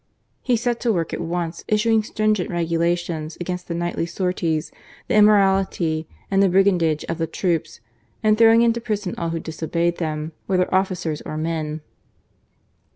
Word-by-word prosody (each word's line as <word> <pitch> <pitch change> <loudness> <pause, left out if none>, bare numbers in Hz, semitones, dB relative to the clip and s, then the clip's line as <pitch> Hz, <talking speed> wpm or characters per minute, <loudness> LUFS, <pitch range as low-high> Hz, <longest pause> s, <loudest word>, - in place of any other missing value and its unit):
He 245 -2 +1
set 240 0 -1
to 235 - +1
work 170 -6 -1
at - - -3
once, 170 0 -3
issuing 220 +1 +3
stringent 215 -3 0
regulations 170 -1 -1
against 180 0 -4
the 170 - -3
nightly 175 0 -2
sorties, 170 -3 -1 0.4
the - - -1
immorality 195 -6 +3 0.2
and 195 0 +3
the 195 - +4
brigandage 180 -5 +3
of 165 0 -4
the 165 - 0
troops, 170 - -2 0.4
and 215 0 +4
throwing 225 +1 +6
into 235 0 +2
prison 210 -5 -2
all 170 - -1
who 165 0 -2
dis 160 0 -8
obeyed 170 +1 0
them, 155 -1 -3 0.2
whether 185 -1 +1
officers 185 -5 0
or 155 - -6
men. 155 -1 -3
175 Hz, 155 wpm, -22 LUFS, 165-200 Hz, 0.4 s, throwing